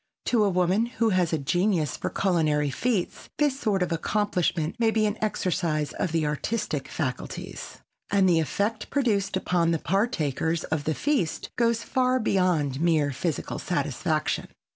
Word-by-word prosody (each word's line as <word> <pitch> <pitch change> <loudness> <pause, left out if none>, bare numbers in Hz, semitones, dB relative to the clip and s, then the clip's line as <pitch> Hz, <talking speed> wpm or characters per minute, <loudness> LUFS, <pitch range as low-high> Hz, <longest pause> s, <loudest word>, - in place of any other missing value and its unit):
To 230 -3 +3
a 205 - +3
woman 185 +5 +2
who 230 -2 0
has 185 -4 +2
a 160 - +1
genius 170 +1 +1
for - - -3
culinary 155 -6 +1
feats, 205 - -2
this 290 -3 +1
sort 200 -7 +1
of 180 - -3
accomplishment 175 -2 0
may 230 -1 +4
be 220 -1 +2
an 210 0 0
exercise 165 -7 -1
of 170 - -2
the 160 -2 +1
artistic 150 -1 -2
faculties; 130 -6 -5 0.3
and 195 -2 +3
the 170 -2 +4
effect 205 +7 -1
produced 205 -9 +1
upon 175 -3 +1
the 165 - +2
partakers 165 - 0
of 155 -2 -2
the 155 - 0
feast 275 - -1
goes 230 -1 +1
far 255 +1 +1
beyond 170 - +1
mere 155 -4 +2
physical 150 +3 -3
satisfaction. - - -1
180 Hz, 155 wpm, -26 LUFS, 155-215 Hz, 0.3 s, may